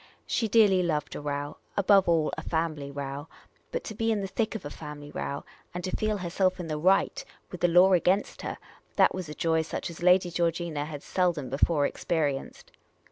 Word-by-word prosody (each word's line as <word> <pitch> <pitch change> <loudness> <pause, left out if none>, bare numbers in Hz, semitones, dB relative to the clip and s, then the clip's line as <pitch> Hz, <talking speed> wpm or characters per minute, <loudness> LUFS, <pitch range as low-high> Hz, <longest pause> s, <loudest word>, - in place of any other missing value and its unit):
She 225 - 0
dearly 205 -4 +5
loved 155 -4 -1
a - - -5
row 145 0 -4
— - - -33
above 195 -2 +5
all, 160 -2 +2
a - - -5
family 160 -4 -2
row; 140 +1 -5 0.4
but - - -3
to - - -6
be 225 +1 0
in 210 -2 0
the 195 - -3
thick 220 +3 -2
of 210 - -6
a 145 - -5
family 150 -1 -9
row, 140 - -4 0.3
and 180 - -4
to 185 - -2
feel 215 -1 0
herself 185 +1 0
in 175 - -4
the 155 -2 -3
right, 190 +4 +2 0.3
with 180 - -8
the 175 - +5
law 180 +3 +6
against 185 +3 +2
her - - -4 0.2
— - - -34
that - - +5
was 185 -3 -5
joy 160 -1 +1
such 160 +1 -4
as 170 - -11
Lady 180 0 +4
Georgina 165 -3 -1
had 150 -2 -7
seldom 175 -7 0
before 145 +2 +2
experienced. 145 -5 -2
170 Hz, 205 wpm, -28 LUFS, 150-185 Hz, 0.4 s, law